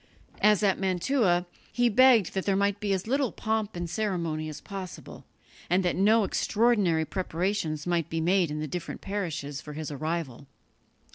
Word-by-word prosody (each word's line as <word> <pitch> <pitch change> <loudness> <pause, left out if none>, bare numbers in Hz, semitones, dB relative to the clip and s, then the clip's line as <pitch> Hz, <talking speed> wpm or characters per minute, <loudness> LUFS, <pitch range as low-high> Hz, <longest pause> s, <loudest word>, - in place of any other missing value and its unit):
As 210 0 +4
at 195 -2 +2
Mantua, 185 0 +1 0.3
he 245 0 +2
begged 240 -3 +5
that 190 0 -3
there 195 - +3
might 200 +1 +1
be 205 -1 -2
as 190 -1 0
little 265 +1 0
pomp 220 -2 -2
and 175 0 -3
ceremony 170 -5 -2
as 150 - -7
possible, 195 -4 -9 0.4
and 180 +2 +2
that 175 - +1
no 215 +3 +4
extraordinary 200 -7 +2
preparations 170 -3 -2
might 175 -3 0
be 165 - -2
made 175 +1 +2
in 150 +1 -4
the 155 - -3
different 175 +3 -6
parishes 165 -8 -4
for 150 - -9
his 155 0 -5
arrival. 145 -3 -4
185 Hz, 165 wpm, -27 LUFS, 160-205 Hz, 0.4 s, begged